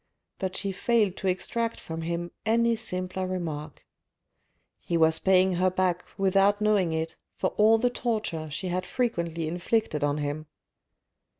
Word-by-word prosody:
But 190 -1 -2
she 200 - -1
failed 210 -1 +1
to 195 - -3
extract 230 +5 -1
from 165 0 -6
him 170 +1 -3
any 230 +1 +3
simpler 185 -4 -3
remark. 160 -5 -5 0.9
He 170 - -1
was 160 0 +4
paying 185 -1 +4
her 185 +1 +3
back 180 -1 0
without 195 +1 +3
knowing 210 -5 +2
it 160 0 -3 0.2
for - - 0
all 220 +2 +5
the 245 +2 +1
torture 215 -11 -2
she 155 +6 -4
had 180 +1 -1
frequently 170 -9 -1
inflicted 175 -1 0
on 145 0 +1
him. 150 +1 -3
185 Hz, 145 wpm, -27 LUFS, 165-210 Hz, 0.9 s, all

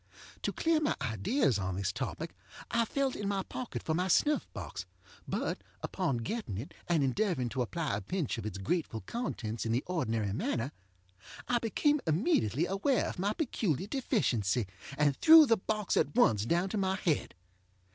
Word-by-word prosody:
To - - -1
clear 325 -1 +2
my 305 -1 +1
ideas 130 - +1
on 95 -1 -2
this 95 -1 -1
topic - - -4 0.4
I 235 0 +3
felt 275 +2 0
in 205 - -3
my 200 -1 0
pocket 250 +4 -5
for 160 - 0
my 180 +3 +1
snuff 295 - +2
box, - - -6 0.4
but, - - -2 0.2
upon 170 -10 -1
getting 210 - -3
it, 120 +8 -6
and 165 -4 +2
endeavoring 135 - 0
to 130 +2 -2
apply 150 +2 -1
a 105 - -3
pinch 160 - -2
of - - -6
its 100 -3 -5
grateful 110 - -2
contents 115 - -4
in 115 - -1
the 120 +4 +1
ordinary 115 - -1
manner, 120 +4 -1 0.8
I 245 -1 +2
became 290 +6 +1
immediately 160 - +2
aware 195 +9 +1
of - - -7
my 200 +3 +1
peculiar 200 - -1
deficiency, 130 - 0 0.3
and 145 -2 +3
threw 320 - +9
the 230 -4 +3
box 210 +1 -1
at - - +1
once 110 - +4
down 175 +6 +1
to 210 - -1
my 190 -1 +1
head. 165 -6 -1
175 Hz, 175 wpm, -31 LUFS, -, 0.8 s, threw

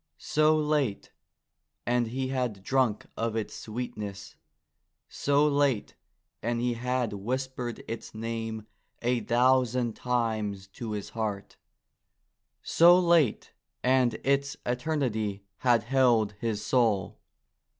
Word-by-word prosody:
So 155 +1 +3
late, 150 -8 0 0.7
and 120 -1 +1
he 130 +3 -3
had 125 -7 -2
drunk 130 -3 +1
of 115 0 -2
its 110 -2 -3
sweetness; 105 -4 -6 0.7
so 145 +1 +2
late, 140 -6 +1 0.5
and 120 +1 -1
he 120 0 0
had 125 -1 -1
whispered 125 +3 -4
its 115 -1 -6
name 115 -1 -4 0.4
a 120 0 +2
thousand 125 0 +2
times 110 -5 -1
to 110 +2 -6
his 105 -1 -5
heart; 105 -3 -4 1.1
so 175 +2 +6
late, 170 - +2 0.3
and 130 -1 +3
its 140 +1 +1
eternity 120 -7 -1 0.2
had 120 -3 +3
held 120 -4 +3
his 110 -2 -2
soul 110 -5 +1
120 Hz, 110 wpm, -28 LUFS, 110-130 Hz, 1.1 s, so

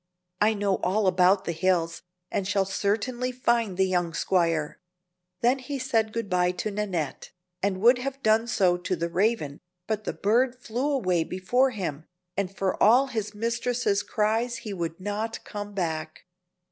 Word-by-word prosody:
I 215 +1 +4
know 200 -2 +1
all 200 +4 0
about 185 +1 +4
the - - -1
hills, 170 0 0 0.3
and 190 - -1
shall 195 -1 +2
certainly 225 +6 -1
find 235 -6 0
the 190 - +4
young 175 -3 0
squire." 165 -4 +1 0.6
Then 250 +3 +3
he 275 +2 -5
said 225 -3 0
good 230 -1 -3
by 180 -1 +2
to 210 +4 -3
Nannette, 190 -8 -3 0.3
and 190 -1 0
would 245 +3 +6
have 275 +1 -5
done 220 +1 +3
so 185 -6 +3
to 180 +1 -2
the 170 0 -2
Raven, 185 -6 0 0.3
but 215 -1 -2
the - - -2
bird 240 +5 +2
flew 250 +3 -2
away 185 - +1
before 215 +11 +1
him, 170 - -4 0.3
and 195 -1 -1
for 195 -1 -2
all 250 +6 +6
his 215 -4 -3
mistress's 230 -1 0
cries 225 +4 0
he 210 - -4
would 170 -2 -4
not 205 +3 -3
come 205 -1 -7
back. 160 -4 -3
205 Hz, 165 wpm, -26 LUFS, 180-230 Hz, 0.6 s, would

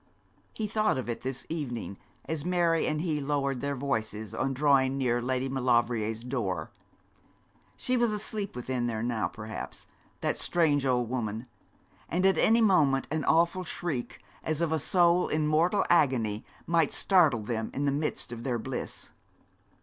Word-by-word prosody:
He 215 - -3
thought 215 -5 +1
of 130 - -4
it 120 - -3
this 130 -1 -4
evening, 120 -11 -4 0.3
as 160 -2 -3
Mary 170 -2 +2
and 155 0 0
he 155 -4 -1
lowered 140 -2 -1
their 140 0 -1
voices 110 -6 -3
on 135 +4 -1
drawing 135 -1 +3
near 120 -2 +1
Lady 130 +1 -1
Maulevrier's 120 -4 +1
door. 100 - -3 1.0
She 255 - 0
was 240 -2 +2
asleep 210 - -3
within 125 0 -2
there 110 -1 -2
now, 115 -2 0
perhaps, 110 -1 -7 0.4
that - - -1
strange 145 -5 +2
old 125 -2 +1
woman; 115 -2 -3 0.6
and 180 +3 +1
at 190 -4 +4
any 230 +1 +4
moment 150 -11 +3
an 155 -1 -1
awful 170 +3 +3
shriek, 160 -7 -4 0.2
as 155 -1 -1
of 170 -2 0
a 160 - +1
soul 175 +2 +3
in 155 0 0
mortal 165 +6 +2
agony, 120 -10 +2 0.2
might 165 -3 +2
startle 155 - +3
them 110 0 -2
in 140 - -2
the 140 - +2
midst 145 -3 -2
of 120 -1 -6
their 125 -2 0
bliss. 130 +3 -5
135 Hz, 160 wpm, -29 LUFS, 120-165 Hz, 1.0 s, at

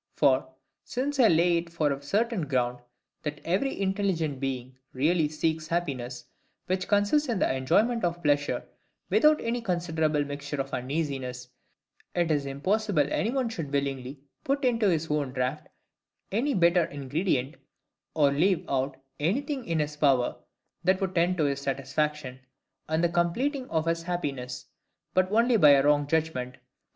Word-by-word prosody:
For, 130 -2 +3 0.3
since 275 +3 -3
I 240 - +7
lay 170 0 +4
it 170 0 -4
for 155 -3 +1
a 140 0 -3
certain 200 +3 0
ground, 125 -3 0 0.4
that 150 -1 -4
every 195 +11 0
intelligent 190 -7 0
being 130 -1 -4 0.2
really 155 +3 +2
seeks 155 +1 -1
happiness, 130 -8 -3 0.4
which 185 0 -1
consists 205 +8 +2
in 230 - 0
the 185 - +1
enjoyment 220 - +2
of 175 0 -1
pleasure, 145 -1 +1 0.5
without 305 0 +5
any 235 +1 -1
considerable 160 -6 0
mixture 145 0 -5
of 135 0 -3
uneasiness; 130 -2 -3 0.7
it 175 -2 +1
is 145 -2 0
impossible 185 +4 +1
any 215 - +1
one 260 -1 0
should 165 -11 -5
willingly 135 -1 -2 0.2
put 275 0 0
into 230 -4 +3
his 165 -2 0
own 145 -4 -1
draught 130 -1 -2 0.6
any 250 +7 +1
bitter 175 -1 +4
ingredient, 140 0 -2 0.6
or 145 -3 +4
leave 175 +4 +2
out 135 0 -1 0.2
anything 265 - -1
in 165 -1 -1
his 150 -1 -1
power 135 -5 +3 0.5
that 185 +1 +3
would 190 -2 -2
tend 180 +1 +2
to 160 - +2
his 140 -1 0
satisfaction, 135 0 -2 0.5
and 160 +2 +1
the 170 - +3
completing 250 - 0
of 160 -1 0
his 165 0 0
happiness, 140 -8 -4 0.5
but 185 0 +2
only 230 +2 +4
by 150 -7 +7
a 140 -1 +6
WRONG 145 0 +3
JUDGMENT. 145 -5 -1
160 Hz, 155 wpm, -27 LUFS, 140-190 Hz, 0.7 s, I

